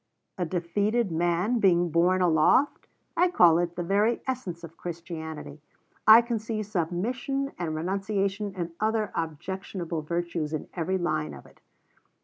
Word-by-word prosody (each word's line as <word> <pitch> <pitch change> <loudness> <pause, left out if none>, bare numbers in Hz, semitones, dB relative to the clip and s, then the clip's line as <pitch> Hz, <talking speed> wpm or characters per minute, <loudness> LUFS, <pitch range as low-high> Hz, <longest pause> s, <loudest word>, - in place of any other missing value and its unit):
"A 175 - 0
defeated 200 +5 0
man 175 +8 +1
being 175 -4 +3
borne 180 +3 +3
aloft? 170 - +3 0.3
I 355 +2 +4
call 170 - +5
it 175 0 -2
the 175 - -2
very 205 +6 +2
essence 200 -10 -4
of 165 0 -10
Christianity. 160 -4 -7 0.5
I 220 +2 +10
can 235 -1 -2
see 215 0 -3
submission 220 - -2
and 160 -3 -2
renunciation 195 +3 -2
and 170 -2 -4
other 220 0 0
objectionable 170 +1 -4
virtues 170 -1 -3
in 155 - -4
every 185 +2 -1
line 75 - -2
of 65 - -13
it." - - -20
180 Hz, 140 wpm, -27 LUFS, 170-210 Hz, 0.5 s, I